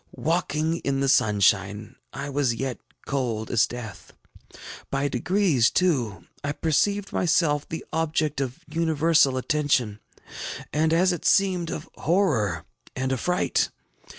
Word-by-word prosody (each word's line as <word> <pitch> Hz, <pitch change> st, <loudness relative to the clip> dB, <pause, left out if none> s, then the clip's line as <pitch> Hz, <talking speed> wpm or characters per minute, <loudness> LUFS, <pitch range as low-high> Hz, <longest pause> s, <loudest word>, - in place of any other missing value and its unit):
Walking 160 Hz, 0 st, 0 dB
in 140 Hz, -4 st, -1 dB
the 135 Hz, -, +1 dB
sunshine, 105 Hz, -2 st, +2 dB, 0.2 s
I 140 Hz, +1 st, -5 dB
was 140 Hz, -4 st, 0 dB
yet 130 Hz, 0 st, -3 dB, 0.3 s
cold 120 Hz, -6 st, -2 dB
as 115 Hz, -3 st, +3 dB
death. 110 Hz, -8 st, -9 dB, 0.8 s
By 135 Hz, +1 st, 0 dB
degrees, 145 Hz, -, +2 dB
too, 135 Hz, -, 0 dB, 0.2 s
I 145 Hz, 0 st, -1 dB
perceived 200 Hz, +7 st, 0 dB
myself 160 Hz, -4 st, +1 dB
the 165 Hz, -, -5 dB
object 155 Hz, -3 st, 0 dB
of 130 Hz, -2 st, -5 dB
universal 160 Hz, -3 st, +2 dB
attention, 130 Hz, -6 st, 0 dB, 0.7 s
and, 155 Hz, +1 st, +2 dB
as 180 Hz, +3 st, +3 dB
it 175 Hz, -, -5 dB
seemed, 185 Hz, -4 st, +2 dB
of -, -, -5 dB
horror 125 Hz, -, +1 dB, 0.3 s
and 130 Hz, +1 st, -1 dB
affright. 180 Hz, +7 st, 0 dB
145 Hz, 125 wpm, -25 LUFS, 125-165 Hz, 0.8 s, as